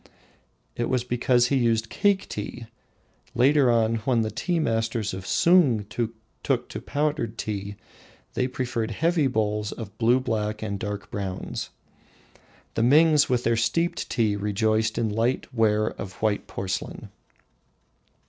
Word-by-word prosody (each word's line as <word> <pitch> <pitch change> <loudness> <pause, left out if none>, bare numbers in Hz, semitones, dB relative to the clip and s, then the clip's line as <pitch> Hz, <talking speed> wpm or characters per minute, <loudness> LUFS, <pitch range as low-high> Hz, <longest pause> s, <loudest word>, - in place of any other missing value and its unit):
It 120 - -2
was 125 -2 +1
because 120 0 +2
he 140 - +2
used 115 -2 +1
cake 200 -1 +1
tea. 115 +3 -6 0.7
Later 135 +1 +4
on, 115 -1 +2
when 115 +1 +1
the 110 - -3
tea 175 -2 -1
masters 115 -6 -1
of 95 0 -7
Sung 150 - +4
took 115 0 -2 0.5
to - - -5
the - - -17
powdered 145 -6 -1
tea, 100 -1 -4 0.6
they 125 - 0
preferred 120 -3 -2
heavy 160 +4 +1
bowls 105 -3 -1
of 110 -4 -8
blue 120 +2 +4
black 110 -3 -2
and 100 -2 -3
dark 105 -1 -5
brown. 95 -2 -4 1.2
The - - -1
Mings, 150 +4 +5
with 125 -1 +1
their 115 0 +2
steeped 140 +10 0
tea, 110 -3 +1
rejoiced 110 +2 0
in 115 - +1
light 115 +6 -1
ware 110 -2 +2
of 95 -1 -7
white 110 -1 -1
porcelain. 95 -1 -5
115 Hz, 140 wpm, -25 LUFS, 105-125 Hz, 1.2 s, Mings